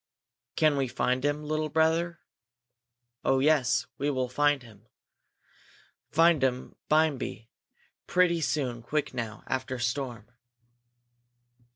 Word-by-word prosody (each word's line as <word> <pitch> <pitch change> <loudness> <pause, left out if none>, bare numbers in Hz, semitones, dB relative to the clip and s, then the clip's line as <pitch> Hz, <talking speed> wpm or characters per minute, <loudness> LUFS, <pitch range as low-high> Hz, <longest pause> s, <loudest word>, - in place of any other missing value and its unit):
"Can 155 -2 +3
we 135 -1 +1
find 125 +1 -1
um, 145 +1 -2
little 155 0 -1
brother?" 165 +2 +1 1.0
"Oh, 135 - +3
yes, 140 -2 +3
we 145 - 0 0.2
find 145 0 +1
um. 110 -1 -17 1.2
Find 165 -2 +4
um 130 -1 -1
bimeby, 150 -7 0 0.6
pretty 175 -2 +3
soon 130 -6 -1
quick 145 +5 -2
now, 115 -3 -5
after 130 0 -3
storm." 120 -2 -3
140 Hz, 100 wpm, -28 LUFS, 125-155 Hz, 1.2 s, Find